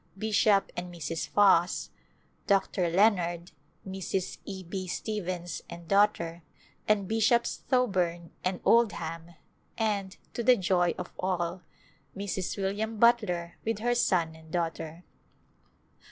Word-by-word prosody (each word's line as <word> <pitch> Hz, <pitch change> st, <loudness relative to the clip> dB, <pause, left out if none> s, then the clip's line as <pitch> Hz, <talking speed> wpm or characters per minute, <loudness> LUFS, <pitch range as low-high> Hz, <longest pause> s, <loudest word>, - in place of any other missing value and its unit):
Bishop 210 Hz, -1 st, +3 dB
and 175 Hz, 0 st, -5 dB
Mrs. 165 Hz, -1 st, -4 dB
Foss, 190 Hz, -4 st, +3 dB, 0.6 s
Dr. 195 Hz, -3 st, +2 dB
Leonard, 175 Hz, -2 st, +2 dB, 0.4 s
Mrs. 190 Hz, -1 st, -3 dB
E. 190 Hz, -2 st, -6 dB
B. 185 Hz, +2 st, -5 dB
Stevens 180 Hz, -3 st, -4 dB
and 170 Hz, -1 st, -9 dB
daughter, 185 Hz, -4 st, +2 dB, 0.5 s
and 205 Hz, -3 st, +2 dB
Bishops 225 Hz, +2 st, +2 dB
Thoburn 180 Hz, -, +1 dB
and 185 Hz, 0 st, -1 dB
Oldham, 170 Hz, -7 st, +1 dB, 0.4 s
and, 205 Hz, -4 st, -1 dB, 0.2 s
to -, -, -2 dB
the 250 Hz, +1 st, +5 dB
joy 175 Hz, -2 st, +2 dB
of 180 Hz, -, -7 dB
all, 180 Hz, -1 st, -1 dB, 0.6 s
Mrs. 195 Hz, -2 st, -3 dB
William 205 Hz, +3 st, -2 dB
Butler 210 Hz, -7 st, +2 dB
with 225 Hz, -1 st, -1 dB
her 240 Hz, +3 st, +1 dB
son 175 Hz, -9 st, +2 dB
and 160 Hz, 0 st, -16 dB
daughter. 165 Hz, -1 st, -3 dB
185 Hz, 115 wpm, -29 LUFS, 170-210 Hz, 0.6 s, the